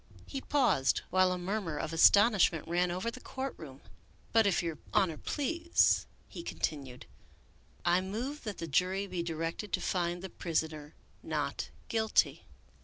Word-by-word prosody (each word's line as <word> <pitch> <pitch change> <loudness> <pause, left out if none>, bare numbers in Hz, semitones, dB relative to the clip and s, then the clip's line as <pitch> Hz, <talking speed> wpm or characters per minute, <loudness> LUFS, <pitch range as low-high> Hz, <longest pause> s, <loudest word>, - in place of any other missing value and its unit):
He 270 - -5
paused 245 - +2
while 185 0 +4
a 180 - -1
murmur 180 -3 -3
of 160 +2 -3
astonishment 200 -1 +5
ran 175 +1 +1
over 185 +7 -2
the 255 - -10
court 265 0 -4
room. 140 -4 -11 0.3
" - - -32
But, 225 -2 +5
if 190 - +2
your 165 -2 -3 0.2
Honor 175 -5 +3
please," 330 - +1 0.2
he - - -8
continued, 140 - -4 0.4
" - - -31 0.3
I 175 +1 +4
move 240 +10 -4
that 210 -4 -5
the 165 - -4
jury 185 +6 +1
be 180 -3 -3
directed 165 +4 -4
to - - +2
find 175 -1 -1
the 190 - -5
prisoner 155 -3 -3 0.3
not - - -3 0.2
guilty." 220 -2 +1
180 Hz, 160 wpm, -31 LUFS, 165-220 Hz, 0.4 s, astonishment